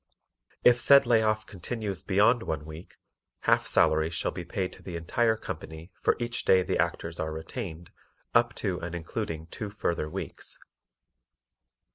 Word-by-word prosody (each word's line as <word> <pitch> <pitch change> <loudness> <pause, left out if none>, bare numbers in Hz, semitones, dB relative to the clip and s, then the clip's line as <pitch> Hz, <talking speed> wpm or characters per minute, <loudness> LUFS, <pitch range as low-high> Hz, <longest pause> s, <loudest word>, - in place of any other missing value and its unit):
If 120 0 +6
said 140 +3 +7
lay 115 -2 +4
off 110 0 +1
continues 100 0 -5
beyond 105 +5 +3
one 80 -7 -3
week, 80 +2 -10 0.5
half - - +3
salaries 80 +2 +3
shall - - 0
be 90 - -6
paid 90 +2 -3
to - - -15
the 90 - -7
entire 110 +7 +1
company 80 -4 -7
for - - +3
each 120 0 -2
day 95 -1 +5
the - - -1
Actors 85 0 -1
are 80 0 -2
retained 80 +1 -6 0.4
up 120 0 +3
to 95 -4 -2
and 85 0 -5
including 80 -1 -4
two 105 - -5
further 85 -6 -2
weeks. - - -5
95 Hz, 155 wpm, -28 LUFS, 80-110 Hz, 0.5 s, said